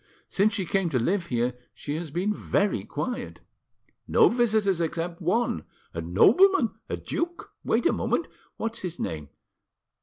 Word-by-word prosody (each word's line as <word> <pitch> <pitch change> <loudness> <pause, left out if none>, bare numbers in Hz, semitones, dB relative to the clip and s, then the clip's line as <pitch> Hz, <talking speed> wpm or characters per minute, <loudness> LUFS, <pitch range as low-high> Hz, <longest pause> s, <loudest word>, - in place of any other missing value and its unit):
Since 205 +2 +2
she 190 - -1
came 190 0 0
to 140 - 0
live 170 - 0
here 120 -1 0 0.2
she 145 - -5
has 165 -1 -5
been 180 +8 0
very 205 0 0
quiet. 250 -2 -4 0.7
No - - +5
visitors 215 -6 +2
except 170 +1 -3
one—a 170 - -2
nobleman, 230 - +5 0.2
a - - -2
duke—wait 345 +1 -3
a - - +4
moment! - - 0 0.3
What's 225 0 -3
his 175 -2 -5
name? 75 -3 -4
185 Hz, 140 wpm, -26 LUFS, 155-220 Hz, 0.7 s, No